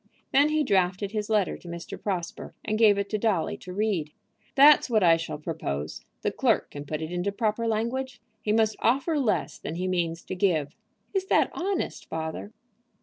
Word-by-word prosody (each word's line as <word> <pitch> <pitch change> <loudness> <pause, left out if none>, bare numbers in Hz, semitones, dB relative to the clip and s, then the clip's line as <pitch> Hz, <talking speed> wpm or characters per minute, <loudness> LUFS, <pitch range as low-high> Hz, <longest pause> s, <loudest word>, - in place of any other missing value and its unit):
Then 285 +2 +5
he 305 0 +2
drafted 195 -3 +1
his 210 -1 -3
letter 210 -3 +2
to - - -15
Mr. 170 0 -7
Prosper, 180 -4 -4
and 215 +1 -1
gave 210 -3 +6
it 200 0 -1
to 215 - 0
Dolly 200 -7 +1
to 185 - -10
read. 190 -6 0 0.5
"That's 285 0 +7
what 215 -4 +3
I 165 -2 +7
shall 165 -2 -4
propose. 80 - -4 0.2
The - - +1
clerk - - +1
can 145 0 -7
put 155 +2 -3
it 160 - -5
into 180 +3 -1
proper 220 +2 -1
language. 245 +4 -2 0.2
He 210 - -1
must 220 0 +3
offer 280 +6 +2
less 235 -7 0
than 160 - -5
he 180 +2 -2
means 170 -2 -1
to - - -6
give." 165 -7 +1 0.4
"Is 385 -1 0
that - - +3
honest, 385 +2 -3
father?" 160 +5 -4
200 Hz, 190 wpm, -27 LUFS, 170-225 Hz, 0.5 s, That's